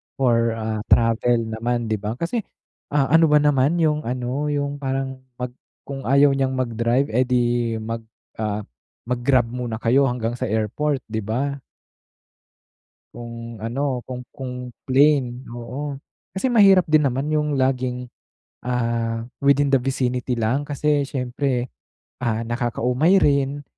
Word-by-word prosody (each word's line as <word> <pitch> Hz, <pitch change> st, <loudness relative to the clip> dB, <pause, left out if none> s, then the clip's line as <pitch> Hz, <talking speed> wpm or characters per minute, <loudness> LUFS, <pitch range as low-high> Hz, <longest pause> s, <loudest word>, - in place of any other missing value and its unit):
for, 115 Hz, -3 st, +2 dB
ah, 110 Hz, -1 st, -3 dB
travel 115 Hz, +1 st, +3 dB
naman, 115 Hz, +1 st, -2 dB
'di 110 Hz, -, 0 dB
ba? 105 Hz, +3 st, -3 dB
Kasi, 170 Hz, -, -2 dB, 0.5 s
ah, 140 Hz, -1 st, +1 dB
ano 165 Hz, 0 st, +6 dB
ba 150 Hz, -, +4 dB
naman 145 Hz, +2 st, +3 dB
yung 150 Hz, -1 st, +2 dB
ano, 125 Hz, +4 st, -2 dB
yung 145 Hz, -1 st, -2 dB
parang 135 Hz, -1 st, -3 dB, 0.2 s
'pag 125 Hz, 0 st, -4 dB, 0.3 s
kung 135 Hz, -4 st, -6 dB
ayaw 140 Hz, +1 st, +5 dB
niyang 135 Hz, -1 st, 0 dB
mag-drive, 120 Hz, +1 st, 0 dB
eh, 125 Hz, +2 st, +2 dB
'di 120 Hz, -2 st, +1 dB
mag, 115 Hz, +1 st, -3 dB, 0.4 s
ah, 105 Hz, -1 st, -2 dB, 0.4 s
mag-grab 120 Hz, -1 st, +1 dB
muna 120 Hz, -2 st, -3 dB
kayo 125 Hz, +5 st, +3 dB
hanggang 120 Hz, -1 st, -2 dB
sa -, -, -1 dB
airport, 125 Hz, +6 st, -1 dB
'di 110 Hz, -, -1 dB
ba? 135 Hz, +7 st, -2 dB, 1.5 s
Kung 115 Hz, 0 st, -8 dB
ano, 125 Hz, +1 st, -2 dB
kung 125 Hz, -1 st, -6 dB
kung 125 Hz, -1 st, -6 dB, 0.2 s
plane, 135 Hz, -2 st, +2 dB
oo. 135 Hz, +5 st, -5 dB, 0.4 s
Kasi 250 Hz, +6 st, 0 dB
mahirap 195 Hz, -5 st, +6 dB
din 150 Hz, -2 st, +5 dB
naman 135 Hz, +4 st, -2 dB
yung 150 Hz, -1 st, +1 dB
laging, 125 Hz, -1 st, 0 dB, 0.6 s
ah, 115 Hz, -2 st, -1 dB, 0.2 s
within 140 Hz, 0 st, +3 dB
the 135 Hz, -, +5 dB
vicinity 125 Hz, -1 st, -1 dB
lang 125 Hz, +6 st, 0 dB
kasi 145 Hz, -1 st, +1 dB
syempre, 125 Hz, -1 st, -2 dB, 0.5 s
ah, 115 Hz, -1 st, 0 dB
nakakaumay 125 Hz, +8 st, +1 dB
rin 140 Hz, -1 st, +1 dB
125 Hz, 135 wpm, -22 LUFS, 115-140 Hz, 1.5 s, ano